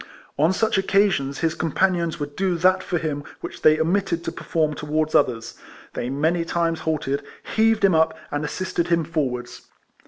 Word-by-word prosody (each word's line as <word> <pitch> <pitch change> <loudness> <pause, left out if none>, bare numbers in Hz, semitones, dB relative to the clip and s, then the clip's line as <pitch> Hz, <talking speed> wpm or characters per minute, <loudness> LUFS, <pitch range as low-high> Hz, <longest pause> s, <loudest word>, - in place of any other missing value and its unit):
On 155 +5 +3
such 200 +1 +1
occasions, 190 -9 +1
his 165 -1 +1
companions 170 0 0
would 145 0 -5
do 190 -2 0
that 185 +2 +3
for 180 - -2
him 150 -3 -3 0.2
which - - -7
they 155 0 +5
omitted 170 +1 0
to - - -3
perform 155 -2 -1
towards 155 +1 -1
others. 120 -5 +1 0.4
They 120 - -3
many 160 +5 +1
times 165 -1 -1
halted, 145 -3 -1 0.3
heaved 220 -2 +4
him 190 - +4
up, 160 0 +2
and 145 +1 -2
assisted 170 +3 -2
him 170 -1 +2
forwards. 130 -7 -3
160 Hz, 165 wpm, -23 LUFS, 150-180 Hz, 0.4 s, they